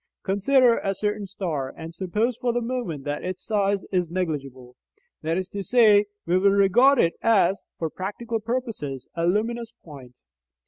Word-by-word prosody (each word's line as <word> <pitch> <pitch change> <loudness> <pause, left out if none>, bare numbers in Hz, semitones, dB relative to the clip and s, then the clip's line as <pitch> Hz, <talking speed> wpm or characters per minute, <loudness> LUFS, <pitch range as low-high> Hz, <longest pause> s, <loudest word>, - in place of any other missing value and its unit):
Consider 235 +5 +3
a 195 -1 -2
certain 210 0 -2
star, 160 -9 -3
and 165 0 -8
suppose 210 +7 -1
for 245 0 -1
the 240 - 0
moment 230 - -4
that 145 +1 -4
its 185 0 -5
size 200 -2 +1
is 180 -3 0
negligible. 140 -8 -4 0.5
That 160 +2 -1
is 185 -1 -2
to 200 - -5
say, 210 0 +5 0.2
we 180 +2 +2
will 200 +1 +4
regard 200 +8 +5
it 170 -7 +3
as, 200 -4 +3 0.2
for 165 - -2
practical 225 +4 -4
purposes, 220 - -4
a 170 0 -1
luminous 225 +4 -1
point. 135 -6 -12
195 Hz, 165 wpm, -24 LUFS, 165-230 Hz, 0.5 s, say